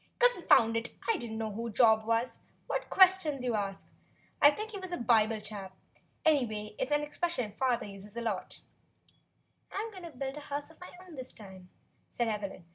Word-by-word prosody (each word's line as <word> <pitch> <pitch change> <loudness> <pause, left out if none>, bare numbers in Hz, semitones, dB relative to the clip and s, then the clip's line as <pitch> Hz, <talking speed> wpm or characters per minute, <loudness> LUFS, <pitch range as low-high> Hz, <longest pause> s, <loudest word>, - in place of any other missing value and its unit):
"Confound 355 - +5
it! 230 +1 -2
I 455 -3 +3
don't 225 -6 -5
know 220 -1 -2
who 230 +3 -4
Job 220 -1 +4
was. 230 +2 0 0.3
What - - -3
questions 370 -8 +5
you 250 - 0
do - - 0
ask! 195 -2 -3 0.5
I 290 - +10
think 430 +9 -4
he 405 - -6
was 370 -1 -7
a 350 - -1
Bible 225 -2 +3
chap. 200 -3 -8 0.5
Anyway, 220 -9 +1
it's 260 - -1
an 295 0 +2
expression 295 -6 -2
father 250 +2 0
uses 200 +2 -10
a - - -2
lot." 215 -5 -3 1.1
"I'm 435 +3 -3
going 380 -3 -10
to 340 - -7
build 270 -1 -5
a 295 - -9
house 285 +2 -4
of 320 - -20
my 360 - -8 0.2
own 355 - -13
this 260 0 -4
time," 190 -3 -12 0.4
said 240 - -1
Evelyn. 200 -4 -4
240 Hz, 195 wpm, -31 LUFS, 215-300 Hz, 1.1 s, I